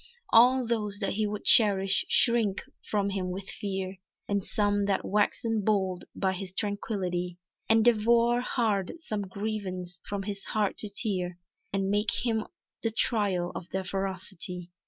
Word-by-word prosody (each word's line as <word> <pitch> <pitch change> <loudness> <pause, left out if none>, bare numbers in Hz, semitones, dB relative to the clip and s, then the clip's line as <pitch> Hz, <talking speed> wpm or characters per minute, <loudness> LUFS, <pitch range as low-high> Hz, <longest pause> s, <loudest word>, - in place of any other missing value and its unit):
All 250 +2 +6
those 215 -3 -1
that 200 -2 -1
he 215 +1 0
would 205 0 -5
cherish 195 -3 +6
shrink 230 -5 +3 0.3
from 200 -1 0
him 190 -2 -1
with 190 +1 -5
fear, 190 -1 -4 0.3
And 200 -1 0
some 205 0 +1
that 200 -1 0
waxen 215 +2 +1
bold 190 -3 0
by 190 -1 0
his 185 0 -4
tranquility, 190 -4 -2 0.3
Endeavour 235 +1 +4
hard 215 -7 0
some 215 -11 -4
grievance 190 -3 -5
from 200 -1 -3
his 200 0 -4
heart 210 -2 -1
to 210 - -2
tear, 185 -4 -2 0.3
And 195 0 0
make 205 +2 +2 0.2
on 235 - +2
him 215 - -6 0.3
the 225 - +1
trial 205 -6 0
of 180 - -7
their 190 0 -2
ferocity. 185 -2 -5
200 Hz, 150 wpm, -28 LUFS, 190-215 Hz, 0.3 s, All